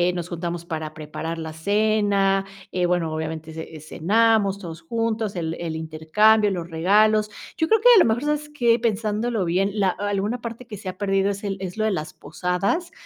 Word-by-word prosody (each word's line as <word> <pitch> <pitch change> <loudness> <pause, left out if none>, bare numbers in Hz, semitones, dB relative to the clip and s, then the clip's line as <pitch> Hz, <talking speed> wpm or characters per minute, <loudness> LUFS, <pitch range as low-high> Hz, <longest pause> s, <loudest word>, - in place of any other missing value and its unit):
nos 175 0 -4
juntamos 170 0 -4
para 155 -2 -5
preparar 160 +2 -5
la 160 -1 -6
cena, 200 +1 +2 0.3
eh, 180 -1 +1
bueno, 170 -3 0
obviamente 160 0 -5
ce 160 -1 -8
cenamos 205 +5 +2
todos 170 -4 -8
juntos, 220 +1 -2
el 165 -1 -2
el 165 -2 -4
intercambio, 160 +8 +3
los 175 -3 -4
regalos. 210 +5 +3 0.3
Yo 320 - 0
creo 445 +2 +3
que - - +4
a - - +8
lo - - +6
mejor 230 +4 +1
sabes 300 0 -1
que 240 -5 +2
pensándolo 220 -1 -1
bien, 185 +4 +1
la 195 - +3
alguna 205 +5 -2
parte 235 +1 -7
que 220 -3 -8
se 195 -1 -6
ha 185 - -8
perdido 195 -1 +1
es 200 +1 -4
el 195 -1 -2
es 185 0 -6
lo 215 - +1
de 220 - +2
las 155 -5 -4
posadas, 180 - -2
195 Hz, 195 wpm, -23 LUFS, 165-220 Hz, 0.3 s, a